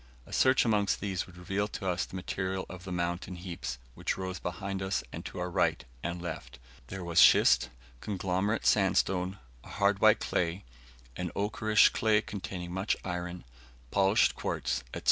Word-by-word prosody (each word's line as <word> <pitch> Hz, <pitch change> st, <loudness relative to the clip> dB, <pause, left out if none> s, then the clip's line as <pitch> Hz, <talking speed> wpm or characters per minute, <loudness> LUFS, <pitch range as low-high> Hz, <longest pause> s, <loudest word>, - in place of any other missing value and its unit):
A -, -, -12 dB
search 130 Hz, -1 st, +4 dB
amongst 105 Hz, -3 st, +2 dB
these 95 Hz, -3 st, -2 dB
would 90 Hz, -1 st, -15 dB
reveal 95 Hz, +3 st, -1 dB
to 95 Hz, -, -5 dB
us 90 Hz, 0 st, 0 dB
the -, -, -11 dB
material 95 Hz, 0 st, -3 dB
of 95 Hz, 0 st, -10 dB
the 95 Hz, -, -6 dB
mountain 85 Hz, +1 st, -2 dB
heaps 85 Hz, -7 st, -5 dB, 0.2 s
which -, -, -2 dB
rose 95 Hz, 0 st, -4 dB
behind 100 Hz, -1 st, -4 dB
and 95 Hz, +1 st, -3 dB
on -, -, -7 dB
our 90 Hz, 0 st, -3 dB
right -, -, +1 dB, 0.2 s
and 85 Hz, +2 st, -3 dB
left; 85 Hz, -2 st, -6 dB, 0.3 s
there 95 Hz, -1 st, -6 dB
was 85 Hz, -1 st, +2 dB
schist, -, -, +6 dB, 0.3 s
conglomerate 95 Hz, -, -1 dB
sandstone, 95 Hz, -1 st, +2 dB, 0.3 s
a -, -, -13 dB
hard 100 Hz, 0 st, +1 dB
white 110 Hz, 0 st, +6 dB
clay, 85 Hz, +2 st, -1 dB, 0.5 s
an 90 Hz, -1 st, -3 dB
ochreish 110 Hz, +1 st, +4 dB
clay 110 Hz, -1 st, +2 dB
containing 95 Hz, -4 st, -6 dB
much 95 Hz, +3 st, 0 dB
iron, 90 Hz, -1 st, -4 dB, 0.5 s
polished 100 Hz, +2 st, +4 dB
quartz, -, -, -2 dB
&c. -, -, -5 dB
95 Hz, 165 wpm, -30 LUFS, 90-100 Hz, 0.5 s, schist